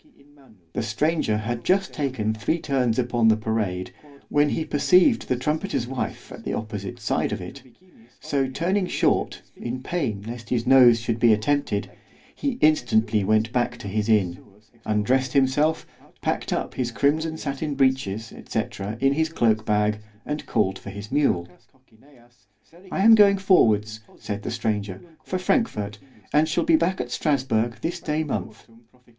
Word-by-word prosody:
The - - -1
stranger 110 +1 0
had 115 +2 -4
just 190 +1 +1
taken 130 -7 -1
three 110 +9 -1
turns 130 -7 0
upon 120 -2 +2
the 110 -1 +5
parade, 105 -5 -2 0.4
when 145 0 +3
he 160 - -2
perceived 180 - +3
the 125 - +1
trumpeter's 150 +3 -2
wife 130 +1 -5
at - - -10
the - - -3
opposite 105 -3 -6
side - - -1
of - - -3
it—so 130 - -6
turning 180 +7 0
short, - - 0
in 125 +2 -5
pain 130 - -2
lest 115 +1 -8
his 120 -2 0
nose 125 -3 +7
should 115 0 -2
be 120 -1 +5
attempted, 110 -1 0 0.4
he 275 -4 -3
instantly 115 -8 +3
went 110 +2 +2
back 125 -1 0
to - - -8
his 105 +2 -2
inn—undressed 105 +5 -1
himself, 145 +4 +2 0.4
packed - - -2
up - - -2
his 125 -2 -2
crimson 155 +6 0
sattin 145 0 -3
breeches, 130 -6 0 0.2
&c. - - +1 0.4
in 135 0 +3
his 160 +2 0
cloak 110 -8 +1
bag, 105 0 +1 0.3
and 150 +1 -4
called 95 0 0
for - - -9
his 100 +3 -8
mule. 130 -12 +1 1.4
I - - -1
am 225 +1 +8
going 205 -2 +6
forwards, 110 - +3 0.2
said 105 -1 -5
the - - -5
stranger, 105 -5 -2 0.2
for 185 - -3
Frankfort——and 135 - -1
shall 170 +2 +1
be 165 - +4
back 170 +4 +1
at 125 -1 -4
Strasburg 125 -7 0
this 175 +2 -3
day 155 -1 -1
month. 110 -6 -5
120 Hz, 150 wpm, -24 LUFS, 110-150 Hz, 1.4 s, am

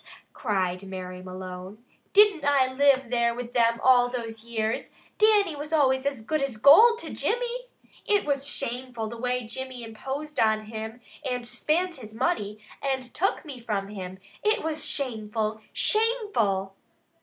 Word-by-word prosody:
cried 190 -5 -1
Mary 185 -1 -7
Malone. 185 +3 -8 0.3
"Didn't 405 -6 +5
I 275 -2 +3
live 270 -2 +3
there 235 -1 +2
with 245 0 -6
them 230 -1 +3
all 245 -1 +6
those 225 -3 -5
years? 225 -1 -2 0.2
Dannie 420 -5 +4
always 285 -3 +1
was 280 -4 -1
good 310 +5 -1
as 270 -5 -2
gold 430 - +8
to - - -7
Jimmy. - - -1 0.4
It 410 -1 +3
was 280 -1 -1
shameful 250 -5 -3
the 235 - -7
way 250 0 -1
Jimmy 255 +2 -6
imposed 270 +7 -6
on 220 -1 +2
him, 220 +2 -7 0.2
and 250 -3 -3
spint 330 +8 0
his 220 -2 -11
money, 225 - -1 0.2
and 265 -2 -1
took 385 0 0
me 275 -5 -8
from 205 -4 -3
him. 190 -2 -7 0.3
It 425 -4 +2
was 315 -1 +1
shameful! 220 -4 -1
Shameful!" 410 - +1
250 Hz, 145 wpm, -26 LUFS, 220-290 Hz, 0.4 s, gold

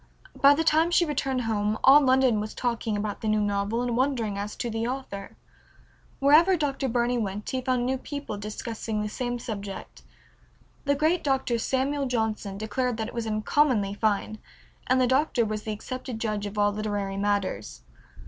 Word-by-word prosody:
By 280 +1 +6
the 325 - 0
time 320 +1 +3
she 345 0 +4
returned 270 -4 -1
home 215 -2 0
all 280 +3 +8
London 260 -4 +3
was 215 +1 -5
talking 230 -3 -1
about 205 0 -3
the 220 - -3
new 215 0 +2
novel 205 +3 0
and 240 -1 -1
wondering 245 -5 0
as 205 +1 -4
to - - -3
the 225 0 -2
author. 245 -7 -6 0.8
Wherever 320 +7 +5
Dr. 275 -3 -1
Burney 240 +1 +1
went 205 -1 -4
he 260 - -1
found 255 0 0
people 285 -6 -5
discussing 215 +1 -4
the 210 - -3
same 245 +2 -3
subject. 200 -4 -7 0.8
The 285 0 +2
great 315 +4 +1
Dr. 265 -4 +1
Samuel 270 +3 0
Johnson 220 -4 -2
declared 230 +3 -2
that 220 0 -3
it - - -12
was 235 -2 -3
uncommonly 215 -1 +1
fine, 215 0 -1 0.5
and 255 +1 +3
the 255 - +4
Doctor 260 -2 +2
was 215 0 -3
the 220 - -2
accepted 250 +3 -5
judge 215 -2 -2
of 205 +1 -8
all 205 0 +3
literary 205 -2 -3
matters. 195 - -2
230 Hz, 175 wpm, -26 LUFS, 210-265 Hz, 0.8 s, all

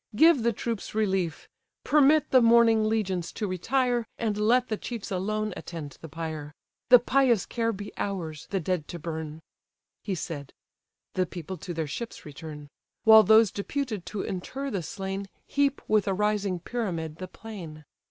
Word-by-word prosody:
give 320 +1 +6
the 235 +1 +2
troops 225 -1 -4
relief: 190 -6 0 0.4
Permit 300 +1 +4
the 255 - +7
mourning 230 -2 +5
legions 190 -6 -1
to 215 - -3
retire, 240 +5 0
And 220 -3 -1
let 240 +4 +3
the 215 - -1
chiefs 230 -1 -6
alone 215 +2 -1
attend 155 -5 -8
the 160 - -9
pyre; 155 -2 -6 0.3
The 250 - +11
pious 245 -3 +3
care 230 -1 -1
be 205 -1 -7
ours, 165 -7 -4
the 195 - 0
dead 180 -2 -2
to 175 - -6
burn—" 160 -1 -6 0.6
He 195 - -2
said: 145 -5 -6 0.6
the 185 -1 +1
people 180 +2 -7
to 180 - -7
their 160 -1 -1
ships 230 - -6
return: 150 0 -9 0.4
While 220 -1 +9
those 220 -1 +6
deputed 215 -2 -3
to 210 - -3
inter 265 +9 -4
the 195 - -1
slain 195 +3 -5 0.2
Heap 280 -1 0
with 215 -2 +3
a 195 - +1
rising 205 -3 0
pyramid 170 -9 -3
the 185 - -6
plain. 175 -8 -9
200 Hz, 160 wpm, -27 LUFS, 170-230 Hz, 0.6 s, The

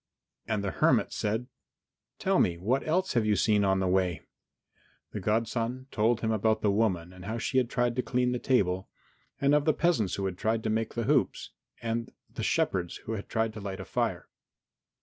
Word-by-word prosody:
And 110 -2 -1
the 100 - -1
hermit - - +2
said, 110 +3 -1 0.7
"Tell - - +2
me 85 - +2
what 120 +10 +1
else 185 +1 +1
you 120 - +4
have 105 - +3
seen 105 -2 +3
on 95 -1 +2
the 95 - +1
way?" 90 -4 +1 0.9
The - - -4
godson 115 +5 -1
told 115 +2 +2
him 110 - 0
about 110 0 +1
the 105 - +3
woman 95 -5 0
and 90 -1 -11
how 110 +3 -3
she 130 +3 +1
had 125 -2 0
tried 120 -1 0
to - - +3
clean 125 0 0
the 125 - -1
table, 95 -9 +1 0.5
and 140 +1 +3
of 150 -1 +3
the 155 - +3
peasants 155 - +1
who 100 - -2
had 90 -2 -3
tried 110 0 0
to 110 - 0
make 110 0 -1
the 120 - -1
hoops, - - +1 0.3
and 115 0 -2 0.2
the - - -5
shepherds 90 -2 0
who - - -4
had 105 -3 -5
tried 110 -1 0
to 110 - -8
light 95 -1 -5
a - - -6
fire. - - -2
110 Hz, 205 wpm, -29 LUFS, 95-120 Hz, 0.9 s, you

